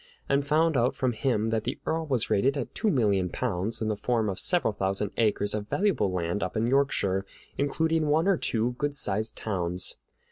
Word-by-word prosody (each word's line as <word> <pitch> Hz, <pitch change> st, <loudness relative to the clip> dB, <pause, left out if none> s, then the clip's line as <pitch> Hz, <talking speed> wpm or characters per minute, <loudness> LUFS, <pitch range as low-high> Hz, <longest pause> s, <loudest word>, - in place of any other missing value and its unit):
and 140 Hz, +1 st, +1 dB
found 160 Hz, +2 st, +3 dB
out 125 Hz, +1 st, +2 dB
from 130 Hz, -1 st, 0 dB
him 110 Hz, -2 st, 0 dB
that 110 Hz, -1 st, 0 dB
the 125 Hz, -, -3 dB
Earl 160 Hz, 0 st, -1 dB
was 130 Hz, -6 st, 0 dB
rated 135 Hz, +8 st, +2 dB
at 135 Hz, -, -4 dB
two 220 Hz, -, 0 dB
million 100 Hz, -, +2 dB
pounds, 95 Hz, +7 st, -2 dB
in -, -, -1 dB
the 105 Hz, -, 0 dB
form 110 Hz, 0 st, 0 dB
of 95 Hz, -, -1 dB
several 175 Hz, -, +3 dB
thousand 95 Hz, +1 st, -1 dB
acres 105 Hz, -2 st, +1 dB
of 105 Hz, -1 st, -3 dB
valuable 170 Hz, -, +1 dB
land 90 Hz, +2 st, -2 dB
up 90 Hz, -, -3 dB
in 110 Hz, -, +1 dB
Yorkshire, 120 Hz, -7 st, +1 dB, 0.4 s
including 160 Hz, +2 st, +1 dB
one 155 Hz, +5 st, +2 dB
or 195 Hz, -, +4 dB
two 115 Hz, -2 st, 0 dB
good 145 Hz, -1 st, -1 dB
sized 110 Hz, -4 st, -1 dB
towns. 90 Hz, -3 st, -1 dB
115 Hz, 200 wpm, -27 LUFS, 100-140 Hz, 0.4 s, or